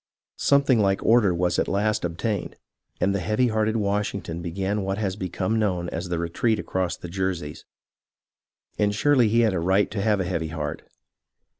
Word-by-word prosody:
Something 140 Hz, -4 st, +4 dB
like 100 Hz, -2 st, +1 dB
order 115 Hz, -4 st, +5 dB
was 90 Hz, 0 st, 0 dB
at -, -, +1 dB
last 105 Hz, +2 st, 0 dB
obtained, 90 Hz, +4 st, -3 dB, 0.4 s
and 100 Hz, -, +2 dB
the 100 Hz, -, 0 dB
heavy 110 Hz, +7 st, +1 dB
hearted 110 Hz, 0 st, +1 dB
Washington 100 Hz, -5 st, -2 dB
began 95 Hz, +4 st, -2 dB
what 95 Hz, 0 st, -2 dB
has 100 Hz, -3 st, -2 dB
become 95 Hz, +3 st, -2 dB
known 90 Hz, -5 st, 0 dB
as 85 Hz, +3 st, -5 dB
the 85 Hz, -, -1 dB
retreat 85 Hz, +7 st, 0 dB
across 95 Hz, -5 st, -2 dB
the -, -, -8 dB
Jerseys. 90 Hz, -4 st, -3 dB, 1.1 s
And 105 Hz, -1 st, +2 dB
surely 125 Hz, -1 st, +3 dB
he 115 Hz, +2 st, +3 dB
had 110 Hz, -4 st, +3 dB
a 95 Hz, -, 0 dB
right 95 Hz, +4 st, +2 dB
to 105 Hz, -2 st, -2 dB
have 105 Hz, -1 st, +2 dB
a 95 Hz, -, -1 dB
heavy 85 Hz, -3 st, -2 dB
heart. 80 Hz, -1 st, -4 dB
100 Hz, 175 wpm, -24 LUFS, 90-110 Hz, 1.1 s, order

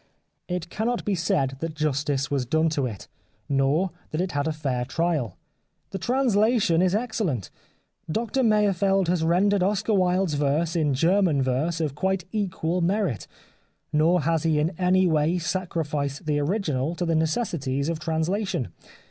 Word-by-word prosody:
It 175 Hz, -2 st, -4 dB
cannot 235 Hz, +3 st, -2 dB
be 205 Hz, -, +1 dB
said 140 Hz, -6 st, 0 dB
that 165 Hz, 0 st, -4 dB
justice 145 Hz, -2 st, -1 dB
was 135 Hz, -4 st, 0 dB
done 160 Hz, +4 st, +2 dB
to 145 Hz, -4 st, -1 dB
it, 105 Hz, -5 st, -8 dB, 0.4 s
nor 140 Hz, +7 st, +1 dB, 0.2 s
that 155 Hz, -, -3 dB
it 185 Hz, +1 st, -1 dB
had 145 Hz, +1 st, -1 dB
a -, -, +1 dB
fair 135 Hz, -5 st, -2 dB
trial. 150 Hz, -, -1 dB, 0.5 s
The 195 Hz, -, -4 dB
translation 220 Hz, -6 st, +2 dB
is 185 Hz, +1 st, +2 dB
excellent. 215 Hz, -, -2 dB, 0.6 s
Doctor 230 Hz, +6 st, -1 dB
Meyerfeld 200 Hz, -4 st, +2 dB
has 175 Hz, -2 st, +1 dB
rendered 190 Hz, +4 st, +3 dB
Oscar 205 Hz, +3 st, +1 dB
Wilde's 185 Hz, -2 st, +2 dB
verse 150 Hz, +3 st, 0 dB
in 150 Hz, -5 st, +1 dB
German 165 Hz, -2 st, +3 dB
verse 145 Hz, +6 st, 0 dB
of 155 Hz, -4 st, -1 dB
quite 190 Hz, +5 st, -1 dB
equal 180 Hz, -4 st, -1 dB
merit, 180 Hz, -, 0 dB, 0.7 s
nor 165 Hz, +3 st, +3 dB
has 165 Hz, +1 st, +1 dB
he 160 Hz, -1 st, +1 dB
in 155 Hz, +3 st, +1 dB
any 185 Hz, +1 st, +3 dB
way 160 Hz, +1 st, +2 dB
sacrificed 160 Hz, -4 st, -2 dB
the 150 Hz, -1 st, +1 dB
original 155 Hz, -3 st, -1 dB
to 175 Hz, -, -2 dB
the 165 Hz, -, +1 dB
neces 160 Hz, +7 st, 0 dB
sities 140 Hz, +1 st, -2 dB
of 165 Hz, -1 st, -2 dB
translation. 160 Hz, -, -1 dB
165 Hz, 155 wpm, -25 LUFS, 145-190 Hz, 0.7 s, rendered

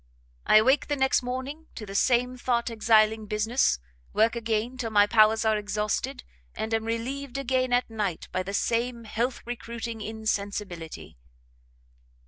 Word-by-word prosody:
I -, -, +5 dB
awake 260 Hz, +6 st, +5 dB
the 290 Hz, -, 0 dB
next 265 Hz, -1 st, +2 dB
morning 260 Hz, +6 st, -5 dB
to 215 Hz, -, -6 dB
the 195 Hz, -, -8 dB
same 250 Hz, +4 st, +2 dB
thought 240 Hz, -1 st, -1 dB
exiling 220 Hz, -1 st, +3 dB
business, 215 Hz, -, +1 dB, 0.4 s
work 225 Hz, +2 st, +3 dB
again 230 Hz, +1 st, -1 dB
till 240 Hz, -3 st, -3 dB
my 205 Hz, -2 st, +5 dB
powers 220 Hz, +1 st, +4 dB
are 215 Hz, -1 st, +3 dB
exhausted, 210 Hz, -, -2 dB, 0.3 s
and 220 Hz, +1 st, -3 dB
am 225 Hz, 0 st, 0 dB
relieved 250 Hz, +4 st, -3 dB
again 260 Hz, -1 st, 0 dB
at 245 Hz, 0 st, +2 dB
night 210 Hz, -6 st, -3 dB
by 185 Hz, -, -1 dB
the 195 Hz, +2 st, -4 dB
same 235 Hz, +2 st, 0 dB
health 235 Hz, +3 st, -2 dB
recruiting 235 Hz, -1 st, -5 dB
insensibility." 205 Hz, -, -4 dB
225 Hz, 145 wpm, -27 LUFS, 215-245 Hz, 0.4 s, I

